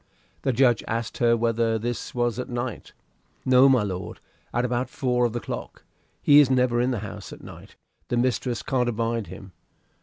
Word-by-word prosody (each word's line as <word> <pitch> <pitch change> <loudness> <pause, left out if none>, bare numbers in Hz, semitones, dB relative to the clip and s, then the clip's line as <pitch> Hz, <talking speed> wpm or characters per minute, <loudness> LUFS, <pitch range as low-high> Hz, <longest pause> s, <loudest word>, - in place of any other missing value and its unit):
The 135 - +1
judge 125 -1 +3
asked 115 0 -3
her 115 -1 +4
whether 115 -1 +1
this 120 +2 -4
was 120 -1 0
at 125 - -4
night 120 -1 -5 0.5
"No, 130 +1 +6
my 130 -5 +4
lord; 95 -3 -5 0.3
at 120 +1 0
about 125 +1 -1
four 125 -2 0
of 115 - -1
the 120 - -2
clock. - - -7 0.4
He 145 0 +7
is 145 -3 +5
never 125 -2 +2
in 125 - +1
the 120 -6 -2
house - - -8
at - - -11
night; - - -12 0.3
the 120 - -1
mistress 125 -1 0
can't 125 -3 0
abide 115 -1 -2
him." 95 +2 -11
120 Hz, 185 wpm, -25 LUFS, 115-125 Hz, 0.5 s, He